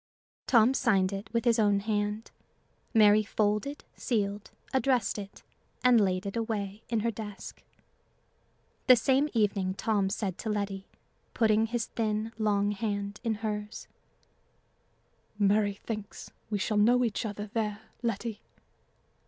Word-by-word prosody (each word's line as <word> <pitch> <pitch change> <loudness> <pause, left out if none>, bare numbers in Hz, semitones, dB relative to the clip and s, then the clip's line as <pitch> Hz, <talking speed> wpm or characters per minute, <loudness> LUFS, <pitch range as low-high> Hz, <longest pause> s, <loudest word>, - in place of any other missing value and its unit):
Tom 235 +1 +5
signed 200 -7 +2
it 195 +3 -6
with 230 +1 -1
his 235 -1 +3
own 205 -2 +3
hand. 210 +1 -2 0.6
Mary 215 -2 +6
folded, 215 +6 -1
sealed, 205 -3 -2 0.2
addressed 255 -6 +1
it, 200 0 -10 0.4
and 245 -3 +6
laid 185 -1 0
it 200 - -4
away 215 -3 -3
in 230 -2 0
her 230 +1 0
desk. 210 -2 -8 1.3
The 255 - +9
same 270 +4 +2
evening 200 -4 +1
Tom 200 -2 0
said 195 -3 -3
to 220 - -4
Letty, 200 -2 -3 0.5
putting 220 -1 +3
his 230 0 -2
thin, 215 0 -2
long 205 -1 +2
hand 200 -1 -3
in 225 -2 0
hers 210 0 -4 1.5
"Mary 205 0 +2
thinks 210 -1 -7 0.2
we 210 - 0
shall 210 +2 -1
know 245 +4 +4
each 220 -3 -2
other 210 -1 -5
there, 215 -1 -2 0.2
Letty." 225 -1 -3
210 Hz, 130 wpm, -29 LUFS, 205-225 Hz, 1.5 s, The